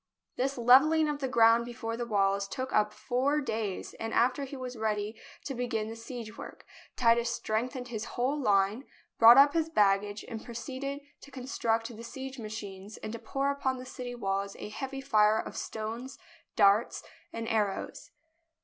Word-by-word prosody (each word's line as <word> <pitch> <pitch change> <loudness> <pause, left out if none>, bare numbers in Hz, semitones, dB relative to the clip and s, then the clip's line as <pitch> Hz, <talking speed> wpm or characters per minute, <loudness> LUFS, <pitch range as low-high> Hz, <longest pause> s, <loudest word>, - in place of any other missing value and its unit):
This 270 +2 -1
levelling 275 +7 +6
of 295 -1 -2
the 270 - -1
ground 230 -1 +5
before 235 -1 -5
the 240 0 -4
walls 200 -2 +1
took 260 +6 -5
up 210 0 +3
four 265 +7 0
days, 220 -8 -3
and 225 0 -3
after 255 +4 +2
he 275 +1 -8
was 255 -1 -6
ready 215 -1 -2 0.3
to 275 - -3
begin 225 -3 -2
the 225 - -6
siegework, 230 -1 -9 0.3
Titus 235 -1 +3
strengthened 245 +3 -2
his 220 -2 -4
whole 255 +4 +1
line, 205 +3 +2 0.3
brought 235 +2 +10
up 280 +1 +7
his 325 -1 +1
baggage, 205 -5 +2
and 225 -2 -6
proceeded 260 +4 -5 0.2
to - - -14
construct 235 -3 -2
the 230 - -9
siege 265 +2 -7
machines 210 -2 -7
and 215 - -6
to 230 - -5
pour 275 +5 -1
upon 265 -2 -1
the 255 - -8
city 250 -1 -7
walls 195 -3 -2
a - - -7
heavy 270 +5 -5
fire 215 -5 +4
of - - -4
stones, 230 +5 -5 0.4
darts, 205 +1 +3 0.3
and 230 0 -5
arrows. 210 -4 -2
235 Hz, 165 wpm, -30 LUFS, 215-260 Hz, 0.4 s, brought